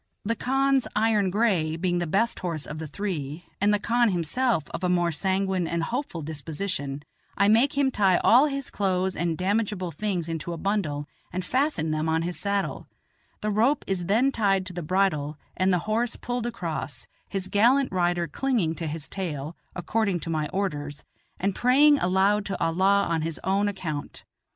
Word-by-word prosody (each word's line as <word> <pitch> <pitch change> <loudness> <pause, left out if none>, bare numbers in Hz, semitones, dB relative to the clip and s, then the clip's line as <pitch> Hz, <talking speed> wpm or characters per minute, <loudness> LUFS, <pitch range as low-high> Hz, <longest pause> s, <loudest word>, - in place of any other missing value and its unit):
The 230 +3 0
khan's 270 +2 +2
iron 215 -3 +3
gray 185 -7 +1
being 175 +1 0
the 175 - -1
best 225 +8 +1
horse 165 -5 -3
of 150 +1 -7
the 160 - -5
three, 155 -2 -4 0.2
and 205 +1 +4
the 210 - +3
khan 235 +3 +2
himself 185 - 0
of - - -5
a 180 - +2
more 175 -1 +2
sanguine 190 +2 0
and 170 0 -1
hopeful 235 - -3
disposition, 145 -1 -4 0.3
I 200 - +4
make 235 +7 +4
him 275 -2 +3
tie 195 -6 +3
all 255 +6 +5
his 275 -2 -4
clothes 190 -2 0
and 170 -1 -1
damageable 195 -1 -1
things 190 -6 -2
into 165 +1 -4
a - - -5
bundle 160 -7 -1 0.2
and 185 0 -3
fasten 255 - 0
them 155 +1 0
on 160 +1 +1
his 175 +1 -3
saddle; 200 -1 -2 0.5
the 215 -1 -1
rope 235 +8 +2
is 180 -3 -2
then 240 +7 +3
tied 195 -6 +1
to 185 - -7
the 175 - -4
bridle 155 -4 0 0.2
and 185 +1 +2
the 180 - +3
horse 230 +3 0
pulled 245 -1 -3
across, 160 - -4 0.2
his 190 -1 -3
gallant 250 +8 +3
rider 175 -2 +1
clinging 210 - 0
to 165 - -3
his 155 0 -4
tail, 160 -5 -4 0.2
according 195 +1 0
to 165 - -4
my 155 -2 -1
orders, 150 -7 -3 0.4
and 195 +1 0
praying 285 +6 +5
aloud 190 +3 +2
to 195 - -3
Allah 190 +4 +3
on 165 -1 0
his 160 -1 -3
own 195 +2 +2
account. 165 -7 -5
190 Hz, 180 wpm, -26 LUFS, 165-215 Hz, 0.5 s, all